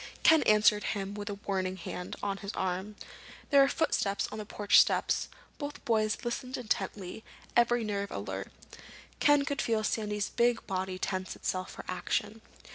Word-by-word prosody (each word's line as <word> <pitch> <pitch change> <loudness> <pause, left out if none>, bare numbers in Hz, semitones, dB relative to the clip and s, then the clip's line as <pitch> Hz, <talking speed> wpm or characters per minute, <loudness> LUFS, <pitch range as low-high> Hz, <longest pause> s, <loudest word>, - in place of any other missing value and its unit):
Ken 320 -2 +7
answered 210 -1 +5
him 200 -1 -2
with 205 0 -5
a 205 - -3
warning 190 -2 -2
hand 180 +1 -6
on 200 -1 -1
his 200 0 -5
arm. 190 +3 -2 0.6
There 280 -1 +7
were 275 - +6
footsteps 210 -10 0
on 215 - -5
the 210 - -6
porch 205 -1 +5
steps. - - +2 0.3
Both 290 -1 -6
boys 215 -2 +2
listened 255 +2 -3
intently, 205 -3 -3 0.3
every 240 0 +4
nerve 200 -2 -2
alert. - - -5 0.7
Ken 290 -1 +5
could 285 -1 -1
feel 220 -2 +1
Sandy's 210 -1 -1
big 240 -1 +2
body 185 -1 -2
tense 185 0 -3
itself 185 0 -3
for - - -9
action. 205 +4 -2
210 Hz, 160 wpm, -30 LUFS, 195-235 Hz, 0.7 s, Ken